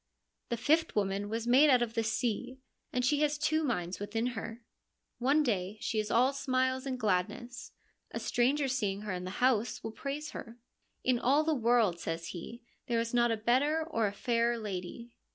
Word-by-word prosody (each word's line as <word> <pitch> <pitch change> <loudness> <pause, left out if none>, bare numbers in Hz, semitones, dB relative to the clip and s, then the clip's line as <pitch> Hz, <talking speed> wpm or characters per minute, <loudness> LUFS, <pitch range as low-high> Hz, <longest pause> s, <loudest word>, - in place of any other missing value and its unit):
The 235 - -1
fifth 315 +6 +2
woman 200 0 0
was 225 +1 -3
made 265 +5 +6
out 250 -3 +5
of 230 -1 -4
the 230 - +1
sea, 240 +3 -2 0.3
and 250 0 0
she 290 +3 +2
has 300 -1 +2
two 315 +1 +1
minds 185 - -2
within 215 +3 -2
her. 230 +1 -6 0.6
One 280 +5 +3
day 200 -5 -1
she 220 - -1
is 210 0 -2
all 255 +5 +3
smiles 260 0 0
and 255 -1 -3
gladness. 220 +5 -2 0.4
A - - -4
stranger 270 +4 +1
seeing 210 -7 -1
her 210 -2 -4
in 180 0 -4
the - - -4 0.2
house 240 -3 +1
will 225 - -4
praise 290 +6 -5
her. 230 +1 -8 0.2
' - - -46
In 250 -2 +2
all 280 +6 +3
the 315 0 +1
world,' 230 - +2
says 165 0 -4
he, 230 +7 -8
' - - -45
there 235 -1 +1
is 230 +1 -2
not 235 -2 +2
better 290 +6 +3
or 225 -8 +1
a - - -2
fairer 235 +3 +1
lady.' 215 +3 -6
235 Hz, 195 wpm, -31 LUFS, 215-260 Hz, 0.6 s, made